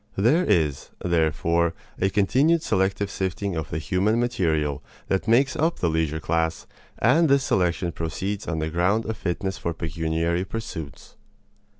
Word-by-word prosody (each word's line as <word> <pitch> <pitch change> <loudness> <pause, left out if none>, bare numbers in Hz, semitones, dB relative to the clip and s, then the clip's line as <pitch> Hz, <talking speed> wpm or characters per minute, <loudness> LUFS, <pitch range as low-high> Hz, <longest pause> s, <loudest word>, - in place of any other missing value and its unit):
There 125 - +3
is, 80 - +1 0.2
therefore, 85 0 +1 0.2
a 95 - +2
continued 135 - +3
selective 95 +1 0
sifting 95 0 -2
of 80 -1 -3
the 80 - -3
human 95 +8 +1
material 80 - 0 0.3
that 95 - 0
makes 130 +6 +3
up 160 +2 +1
the 85 - 0
leisure 80 -1 0
class, 80 +1 -1 0.3
and 165 -1 +4
this 140 -1 +4
selection 90 -3 +1
proceeds 95 +6 -4
on 85 - -2
the 80 0 -2
ground 95 +7 +1
of 110 - -3
fitness 95 +1 -3
for 85 -1 -3
pecuniary 80 +2 -1
pursuits. 95 -8 -7
90 Hz, 145 wpm, -24 LUFS, 80-105 Hz, 0.3 s, and